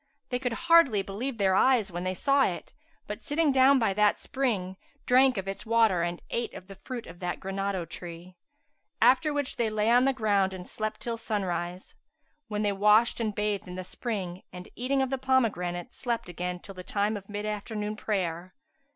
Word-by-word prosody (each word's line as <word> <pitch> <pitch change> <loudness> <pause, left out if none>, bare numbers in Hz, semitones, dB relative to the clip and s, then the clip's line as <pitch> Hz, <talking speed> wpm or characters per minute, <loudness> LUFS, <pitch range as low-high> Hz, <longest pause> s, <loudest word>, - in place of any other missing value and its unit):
[FN#379] - - -51
They 250 - -1
could 245 -2 -2
hardly 335 -9 +5
believe 230 +7 -4
their 195 -2 +3
eyes 225 -1 +3
when 175 +1 -4
they 185 0 -2
saw 275 +8 +3
it; - - -4 0.3
but, - - -6
sitting 310 0 +1
down 270 +1 +6
by 225 -6 +2
that 210 +1 +3
spring, 210 -9 -2 0.3
drank 255 -1 +5
of 195 0 -3
its 195 - -4
water 225 -5 +3
and 175 0 -3
ate 235 - -2
of 185 - -9
the 195 - -10
fruit 250 -3 -5
of 165 +1 -12
that 180 -1 -3
granado 195 -2 -3
tree; 175 +2 -9 0.6
after 265 +4 +4
which 290 -2 -2
they 235 -2 +1
lay 215 +1 +1
on 245 +2 +5
the 270 - +4
ground 200 -5 +1
and 180 -1 -9
slept 215 0 -4
till 235 -1 -3
sunrise, 180 -5 -3 0.5
when 210 -1 -2
they 205 - +2
washed 210 +4 +4
and 215 -3 -1
bathed 210 -2 -1
in 180 - -7
the 185 - -5
spring 185 -3 -4
and, 180 0 -10
eating 265 +2 +1
of 265 - -3
the 270 - -1
pomegranates, 205 -10 0
slept 235 -5 -2
again 180 0 -4
till 195 - -11
the 185 -1 -9
time 205 +3 0
of 200 -1 -8
mid 205 0 -4
afternoon 210 0 -3
prayer. 185 -4 -3
210 Hz, 200 wpm, -28 LUFS, 185-245 Hz, 0.6 s, down